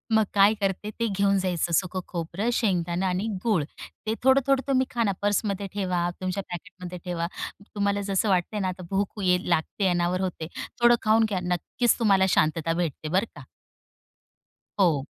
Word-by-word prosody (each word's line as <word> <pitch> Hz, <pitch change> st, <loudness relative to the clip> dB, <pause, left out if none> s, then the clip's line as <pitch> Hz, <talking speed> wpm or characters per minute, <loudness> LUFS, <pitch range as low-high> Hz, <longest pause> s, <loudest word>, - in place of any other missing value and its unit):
मग 220 Hz, -, +5 dB
काय 200 Hz, +1 st, +6 dB
करते, 195 Hz, +1 st, -1 dB
ते 230 Hz, -, +1 dB
घेऊन 200 Hz, -1 st, +2 dB
जायचं 180 Hz, -3 st, -1 dB
सुक 185 Hz, +2 st, +1 dB
खोबरं, 175 Hz, +6 st, -3 dB
शेंगदाणे 180 Hz, -5 st, 0 dB
आणि 185 Hz, +3 st, 0 dB, 0.2 s
गूळ. 210 Hz, -9 st, +2 dB, 0.4 s
ते 220 Hz, -, +1 dB
थोडं-थोडं 270 Hz, +1 st, +4 dB
तुम्ही 260 Hz, -1 st, +3 dB
खा 235 Hz, -2 st, 0 dB
ना 200 Hz, -, +2 dB
पर्समध्ये 205 Hz, -1 st, 0 dB
ठेवा, 185 Hz, -3 st, -1 dB, 0.2 s
तुमच्या 185 Hz, +1 st, -2 dB
पॅकेटमध्ये 180 Hz, 0 st, -7 dB
ठेवा. 170 Hz, -2 st, -2 dB, 0.5 s
तुम्हाला 200 Hz, 0 st, +1 dB
जसं 195 Hz, +2 st, +1 dB
वाटतंय 190 Hz, +3 st, +1 dB
ना 190 Hz, -, 0 dB
आता 185 Hz, 0 st, -5 dB
भूक 200 Hz, +2 st, -1 dB
ये 180 Hz, -1 st, +4 dB
लागते, 175 Hz, +4 st, +1 dB
अनावर 175 Hz, +1 st, +1 dB
होते, 180 Hz, -4 st, -3 dB, 0.3 s
थोडं 240 Hz, 0 st, +7 dB
खाऊन 220 Hz, +1 st, +4 dB
घ्या. 195 Hz, -3 st, -1 dB
नक्कीच 180 Hz, +8 st, 0 dB
तुम्हाला 195 Hz, -4 st, +4 dB
शांतता 165 Hz, -1 st, +2 dB
भेटते. 165 Hz, -2 st, -2 dB
बरं 190 Hz, +6 st, +2 dB
का. -, -, -10 dB, 1.4 s
हो. 160 Hz, -8 st, +3 dB
190 Hz, 160 wpm, -26 LUFS, 175-210 Hz, 1.4 s, थोडं